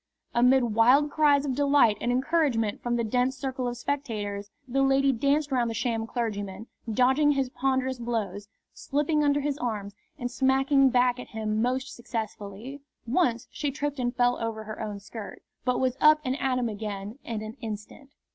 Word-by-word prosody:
Amid 250 +2 +5
wild 255 +7 +5
cries 290 -2 +3
of 270 - -1
delight 280 -5 +4
and 240 - 0
encouragement 255 -5 +1
from 240 0 -1
the 235 - 0
dense 250 +3 0
circle 260 -1 -3
of 240 0 -3
spectators, 210 -7 -3 0.2
the 270 +2 +1
lady 270 0 +4
danced 280 +4 +1
round 245 -3 +1
the 225 - -4
sham 225 -1 -1
clergyman, 210 -4 -3 0.3
dodging 265 +6 +4
his 270 -2 -1
ponderous 260 -1 0
blows, 210 -4 -3 0.2
slipping 295 +2 0
under 290 0 +2
his 290 0 -2
arms, 210 -4 -3 0.2
and 245 -3 -4
smacking 270 +1 +3
back 250 0 +2
at - - -8
him 215 -1 -2
most 255 +3 -1
successfully. 225 +2 -6 0.2
Once 240 -2 +1
she 295 - -2
tripped 290 0 -3
and 245 0 -1
fell 245 0 +2
over 225 -1 -3
her 215 0 -7
own 205 -2 -4
skirt, 205 +1 -9 0.2
but 250 -1 +1
was 260 0 0
up 305 0 +7
and 255 0 0
at 260 -1 +1
him 245 -1 0
again 210 +1 -5
in 220 -2 -4
an 215 +1 -7
instant. 220 +5 -7
250 Hz, 175 wpm, -27 LUFS, 225-275 Hz, 0.3 s, up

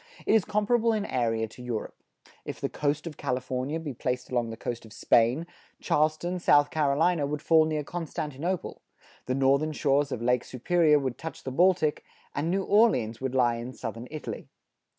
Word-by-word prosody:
It - - +3
is 220 -4 +4
comparable 225 +2 +2
in 210 -2 -1
area 115 - 0
to 125 - -13
Europe. 120 -3 -4 0.5
If - - -6
the - - -2
coast 150 +1 -1
of 160 -4 -7
California 130 +4 -2
be 150 -4 -5
placed 125 +1 -3
along 120 -2 0
the 115 - -7
coast 120 0 -5
of 110 - -14
Spain, 120 +8 +3 0.3
Charleston, 155 +4 0
South 145 -3 +4
Carolina, 155 +1 +2
would 150 +1 -4
fall 160 -1 +5
near 155 -1 -1
Constantinople; 165 +1 -4 0.5
the 130 - 0
northern 140 +3 +2
shores 145 -1 +1
of 125 - -2
Lake 125 +1 +1
Superior 150 +4 +2
would 130 -3 -3
touch 160 - -7
the 130 - -4
Baltic, 165 0 +2 0.3
and 150 +3 -1
New 195 +2 +1
Orleans 160 - +3
would 130 -1 -2
lie 120 -2 +3
in 120 +2 -6
southern 115 0 -6
Italy. 155 0 -6
145 Hz, 175 wpm, -27 LUFS, 125-165 Hz, 0.5 s, fall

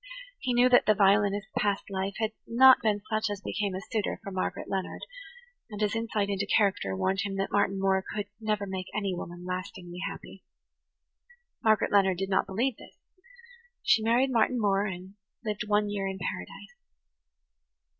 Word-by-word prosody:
He 250 -2 -1
knew 245 +1 +6
that 245 -4 +5
the 215 - +5
violinist's 200 0 +3
past 200 -1 +1
life 190 0 -2
had 220 -1 -1 0.2
not 260 +3 +7
been 210 -3 0
such 215 0 0
as 205 -1 -4
became 200 -2 -2
a 190 - -4
suitor 215 -3 -1
for 200 - -6
Margaret 185 -1 -3
Leonard; 190 -1 -3 0.7
and 210 -2 -7
his 210 0 0
insight 225 -3 -1
into 200 0 -2
character 195 - +1
warned 190 - 0
him 200 -1 -3
that 195 - -2
Martin 200 -1 +1
Moore 190 0 +2
could 205 -1 -2
never 215 -2 -1
make 190 -1 -5
any 200 -3 -1
woman 175 0 -7
lastingly 180 -1 -6
happy. 195 -1 -11 1.2
Margaret 220 -2 +3
Leonard 190 -3 +4
did 195 +1 -3
not 190 - +2
believe 230 +6 -1
this. - - -15 0.9
She 225 - +4
married 240 +4 +2
Martin 240 +1 +2
Moore 200 -1 +2
and 185 0 -7 0.3
lived 210 0 -3
one 210 0 +2
year 200 -1 -2
in 190 0 -4
paradise. 190 - -6
200 Hz, 170 wpm, -28 LUFS, 190-215 Hz, 1.2 s, not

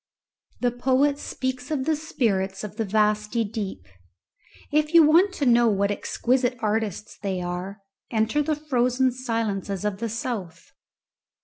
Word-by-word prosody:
The 245 -1 +2
poet 265 +4 +2
speaks 260 -2 -4
of 280 -4 -1
the 315 0 +2
spirits 195 -11 -1
of 210 0 -7
the 225 - 0
vasty 210 +2 +1
deep; 200 - -5 0.9
if 305 +2 +1
you 335 - +9
want 335 +6 +5
to 285 - -1
know 240 -1 +5
what 200 -1 +2
exquisite 250 +4 0
artists 215 -1 -2
they 195 -2 -2
are, 180 +3 -5 0.3
enter 225 +6 +1
the 305 +1 0
frozen 260 -3 +1
silences 220 -6 -2
of 200 -2 -2
the 230 0 -2
south. 205 -7 -5
230 Hz, 140 wpm, -25 LUFS, 205-260 Hz, 0.9 s, you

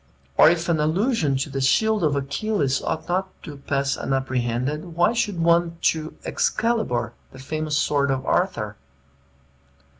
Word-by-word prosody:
Or - - +7
if 170 0 0
an 165 -3 +1
allusion 160 - +1
to 135 +2 -3
the 135 0 -2
shield 215 +9 +2
of 150 -2 +2
Achilles 140 0 -1
ought 160 - -3
not 185 +2 -1
to 150 - -8
pass 140 0 -1
unapprehended, 135 +4 -2
why 175 +6 +3
should 210 -6 -1
one 170 0 +2 0.2
to 155 0 -7
Excalibar, 165 - 0 0.2
the - - -13
famous 155 +3 -2
sword 140 -2 +1
of 135 -1 -1
Arthur? 105 - 0
155 Hz, 145 wpm, -23 LUFS, 135-175 Hz, 0.2 s, Or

